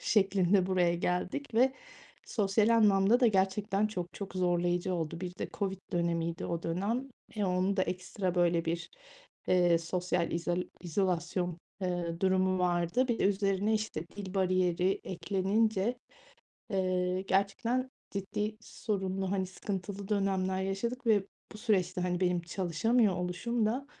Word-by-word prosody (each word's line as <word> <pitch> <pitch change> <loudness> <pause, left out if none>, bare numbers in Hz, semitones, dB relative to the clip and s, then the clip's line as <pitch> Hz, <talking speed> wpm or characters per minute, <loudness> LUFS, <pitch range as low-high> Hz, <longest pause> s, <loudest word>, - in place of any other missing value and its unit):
şeklinde 195 -2 +3
buraya 180 -2 +2
geldik 180 +9 -2
ve 260 +3 +4 0.5
sosyal 210 +1 +2
anlamda 215 0 +5
da 250 - +6
gerçekten 195 0 +2
çok 180 -4 -5
çok 200 -1 -7
zorlayıcı 175 0 +1
oldu. 165 -1 -3
Bir 180 -1 -5
de - - -3
COVID 195 -3 -2
dönemiydi 170 -1 -1
o 170 -1 -3
dönem. 205 +10 -1 0.3
E, 210 - +1
onun 185 +1 +1
da 185 - +3
ekstra 185 0 -2
böyle 170 -1 +2
bir, 170 +1 -3 0.6
ııı, 175 -2 +4
sosyal 175 +1 -1
izal 175 +1 0 0.2
izolasyon, 175 -1 -1 0.2
ııı, 175 -2 -2
durumu 185 0 +2
vardı. 180 +7 +1
Bir 235 - 0
de - - +1
üzerine, 200 +1 +2
işte, 215 -7 -2
dil 195 -1 -6
bariyeri 185 0 +2
eklenince, 195 +5 0 0.8
ııı, 185 -1 +1
gerçekten 200 +7 0 0.2
ciddi 210 +2 -3
sorunlu, 190 -4 -3
hani, 190 -2 0
sıkıntılı 195 +1 -5
dönemler 190 -2 0
yaşadık 235 +6 -3
ve 205 -3 +4 0.3
bu 210 - -10
süreçte, 185 -5 +1
hani, 180 0 -1
benim 180 -1 +2
çalışamıyor 190 +5 +1
oluşum 215 +6 -1
da, 260 +6 -1
190 Hz, 135 wpm, -31 LUFS, 180-205 Hz, 0.8 s, da